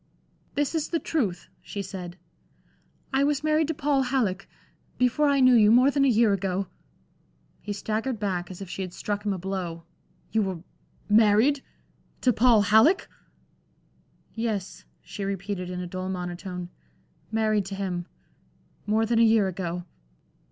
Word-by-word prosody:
"This 290 +1 0
is 320 -2 -1
the 335 - +1
truth," 210 - -2
she 200 - -6
said. 180 -2 -7 1.0
"I 270 +1 +3
was 290 0 +1
married 310 0 +2
to 320 - -2
Paul 290 -2 +1
Halleck 225 -8 -1 0.5
before 250 +4 +2
I 280 -1 +3
knew 255 -1 +6
you, 215 -3 +6
more 255 +4 +6
than 280 0 +2
a - - +4
year 225 -3 +4
ago." 195 0 -1 1.0
He 210 - -6
staggered 220 +4 -2
back, 185 -4 -2
as 185 +1 -8
if - - -10
she 190 - -6
had 185 -2 -6
struck 205 0 -3
him 210 - 0
a 190 - -2
blow. 180 -3 -4 0.5
"You 220 - +2
were 190 -4 -2 0.5
married 220 +6 +4 0.6
to 250 - +3
Paul 225 -1 +5
Halleck?" 220 - +4 1.3
"Yes," 220 -4 -3 0.2
she 200 - -7
repeated, 195 -1 -3
in 180 0 -4
a - - -4
dull 185 +1 -5
monotone, 180 0 -5 0.6
"married 215 -2 +1
to 195 +1 -5
him 180 -3 -3 0.8
more 220 +2 +2
than 230 0 +1
a - - +5
year 220 -3 +4
ago." 175 -1 -4
205 Hz, 155 wpm, -26 LUFS, 185-250 Hz, 1.3 s, knew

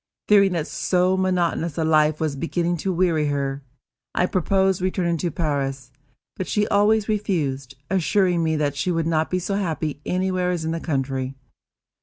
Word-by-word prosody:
Fearing 200 -2 +5
that 165 -3 -1
so 180 +1 +1
monotonous 175 -4 0
a 165 - +1
life 155 -1 +3
was 155 -3 -1
beginning 170 +3 -1
to 190 +4 -2
weary 170 -4 +1
her, 140 -1 -2 0.5
I 180 - +3
proposed 190 +1 +1
returning 180 -2 0
to 175 +2 -1
Paris; 135 -5 -2 0.5
but 185 - -3
she 210 0 +1
always 210 +1 +3
refused, 150 - -2
assuring 185 -1 +2
me 160 -1 +1
that 145 -2 0
she 165 - -1
could 165 -2 0
not 160 -1 +1
be 185 - 0
so 185 +2 -3
happy 160 -7 -2
anywhere 185 0 0
as 175 -3 -2
in 160 - -1
the 165 - -2
country. 135 -4 -2
170 Hz, 170 wpm, -23 LUFS, 150-185 Hz, 0.5 s, Fearing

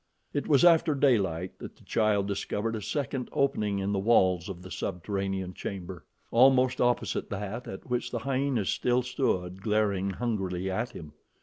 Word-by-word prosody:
It 145 - -2
was 145 +1 +5
after 165 -3 +5
daylight 95 - +1
that - - -9
the - - -21
child 105 -3 +1
discovered 105 +3 -2
a 110 - -4
second 135 +1 -3
opening 105 -7 +1
in 100 +1 -1
the 100 - 0
walls 95 -4 +3
of 90 -2 -7
the 95 - -10
subterranean 95 0 -3
chamber, 90 -2 -6 0.3
almost 130 +1 +5
opposite 120 0 0
that 105 +3 -5
at 95 - -8
which 125 -1 -1
the 120 - -3
hyenas 130 -3 0
still 125 0 +1
stood 95 -8 -1
glaring 100 -2 +1
hungrily 95 -4 -2
at 110 +6 -1
him. 75 -3 -10
105 Hz, 165 wpm, -28 LUFS, 95-125 Hz, 0.3 s, was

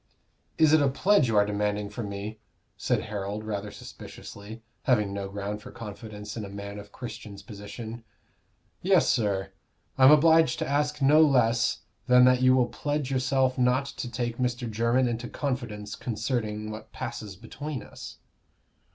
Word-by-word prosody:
"Is 155 -1 +5
it 155 - +6
a 140 - +4
pledge 190 +3 +3
you 115 - 0
are 105 - +5
demanding 105 0 -1
from 105 -2 -5
me?" 105 +2 -6 0.4
said - - 0
Harold, 105 0 -4
rather 105 -1 -4
suspiciously, 105 +2 -10 0.2
having 105 -6 +2
no 100 -1 -4
ground 100 +1 -4
for - - -10
confidence 105 -1 -8
in 110 - -4
a 100 - -7
man 100 +1 -7
of 100 0 -12
Christian's 110 -5 -8
position. 110 +2 -8 0.8
"Yes, 185 -2 +4
sir; 100 -5 +1 0.5
I 130 - +8
am 135 - +10
obliged 160 -2 +5
to - - -2
ask 145 +1 0
no 150 +3 +6
less 115 -6 +3 0.3
than 125 0 +7
that 125 0 +4
you 130 0 +6
will 125 -1 +4
pledge 145 +2 -3
yourself 130 0 +1
not 125 +2 +3
to 125 - -6
take 120 0 -3
Mr. 125 -1 -1
Jermyn 115 +3 +2
into 120 +1 -3
confidence 120 -7 -4
concerning 110 -3 -3
what 110 0 -9
passes 105 -3 -6
between 130 +6 -6
us." - - -10
115 Hz, 160 wpm, -27 LUFS, 105-130 Hz, 0.8 s, am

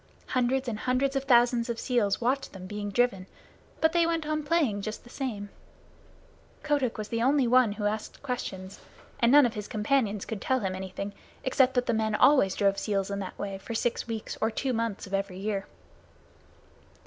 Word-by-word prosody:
Hundreds 255 +1 +1
and 215 -3 -3
hundreds 260 +3 0
of 270 0 -1
thousands 240 -2 +4
of 235 - -2
seals 225 -6 +1
watched 260 +3 -1
them 190 -2 -9
being 205 +1 -4
driven, 200 -4 +1 0.5
but 320 0 +4
they 340 -1 +3
went 330 -2 -1
on 305 0 -1
playing 290 -10 +1
just 215 +2 -5
the 240 - -15
same. 215 -8 -4 1.1
Kotick 285 -5 0
was 215 -1 -5
the 230 0 -1
only 265 +1 +3
one 245 -3 +4
who 210 0 -4
asked 215 +5 -3
questions, 200 -7 -5 0.4
and 235 0 +4
none 290 -1 +8
of 235 - -1
his 210 -3 -5
companions 215 -2 0
could 220 -3 -5
tell 260 -1 +1
him 190 -2 -1
anything, 190 +2 -5 0.3
except 260 0 +3
that 250 0 +2
the 235 - +1
men 220 -1 0
always 260 -7 +5
drove 195 -1 +2
seals 200 -2 -1
in 200 - -2
that 190 -2 -6
way 195 -1 -4
for 230 +4 -6
six 235 +1 -1
weeks 225 -2 -5
or 220 - +2
two 255 +3 -2
months 230 -3 -2
of 195 - -11
every 195 -1 -2
year. 200 0 -3
230 Hz, 195 wpm, -28 LUFS, 205-260 Hz, 1.1 s, none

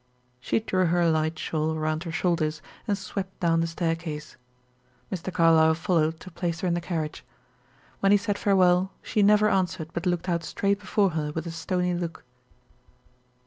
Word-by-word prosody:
She 125 - 0
drew 185 -4 +1
her 170 0 +2
light 160 0 0
shawl 160 0 -1
around 155 +2 -2
her 165 - -4
shoulders, 160 -3 0 0.2
and 205 -2 +1
swept 195 0 -6
down 165 -2 +2
the 165 - 0
staircase. 165 -2 -3 0.8
Mr. 190 -1 -4
Carlyle 160 -2 +5
followed 165 -2 +1
to 185 - -10
place 170 -1 -3
her 185 - 0
in 175 - +1
the 175 - -1
carriage. 160 -3 -4 0.8
When 195 - +3
he 205 - +7
said 205 0 -2
farewell, 185 -1 +3
she 210 - 0
never 210 +1 +5
answered 180 -5 0
but 170 +1 -2
looked 175 0 -1
out 170 -2 0
straight 200 +3 0
before 200 0 +1
her 150 -2 -2
with 160 +1 -4
a 170 - -4
stony 180 +2 -1
look. 175 -1 -4
170 Hz, 175 wpm, -26 LUFS, 160-190 Hz, 0.8 s, he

